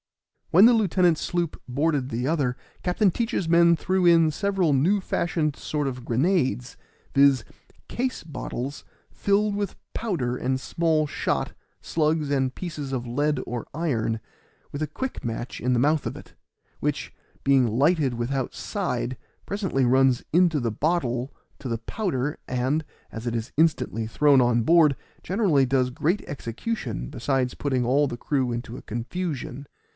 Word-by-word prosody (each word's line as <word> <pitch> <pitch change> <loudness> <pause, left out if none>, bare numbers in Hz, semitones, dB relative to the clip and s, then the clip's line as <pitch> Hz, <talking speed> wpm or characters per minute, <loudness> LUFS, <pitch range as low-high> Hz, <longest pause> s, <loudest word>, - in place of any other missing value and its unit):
When 190 +6 +7
the 240 - +7
lieutenant's 185 -6 +3
sloop 175 -3 -2
boarded 140 0 0
the 120 +2 -2
other 140 -6 0 0.3
Captain 190 +3 +3
Teach's 225 -4 -1
men 170 0 +5
threw 185 +2 +1
in 165 -2 +6
several 190 -2 +1
new 170 +10 +3
fashioned 165 -5 -1
sort 150 -2 -2
of 125 -2 -5
grenades, 130 -1 0 0.4
viz., 140 -3 +5 0.4
case 255 +1 -2
bottles 140 -3 -5 0.3
filled 205 +1 +1
with 205 -1 -3 0.2
powder 155 - -1
and 130 +1 -1
small 160 +2 +1
shot, - - -2 0.3
slugs, 155 -2 0
and 135 -2 +1
pieces 150 -5 -5
of 125 -2 -3
lead 145 +4 0
or 120 0 -5
iron, 115 -9 -1 0.5
with 145 - -4
a 155 - 0
quick 260 - -5
match 120 +1 -4
in 125 - +1
the 125 - +3
mouth 150 +3 +2
of - - -4
it, - - -13 0.5
which, - - -2 0.3
being 135 -3 +4
lighted 140 +3 +2
without 125 +2 -2
side, 130 - -2 0.3
presently 190 -10 0
runs 130 0 +3
into 170 -3 +4
the 120 -3 -1
bottle 130 -2 -1 0.3
to 135 - -6
the 115 - -1
powder, 145 - -2
and, 130 +5 0 0.3
as 115 0 -7
it 120 -1 -1
is 115 +1 -4
instantly 145 -8 +1
thrown 140 +4 +4
on 120 -1 +3
board, 155 -1 +5 0.3
generally 180 -9 +2
does 130 -1 +1
great 160 +10 0
execution 145 - -4
besides 130 -1 -1
putting 130 -4 -1
all 140 +4 +3
the 120 - -5
crew 130 -2 0
into 120 0 -5
a - - -8
confusion. 140 +2 -4
140 Hz, 150 wpm, -25 LUFS, 125-170 Hz, 0.5 s, When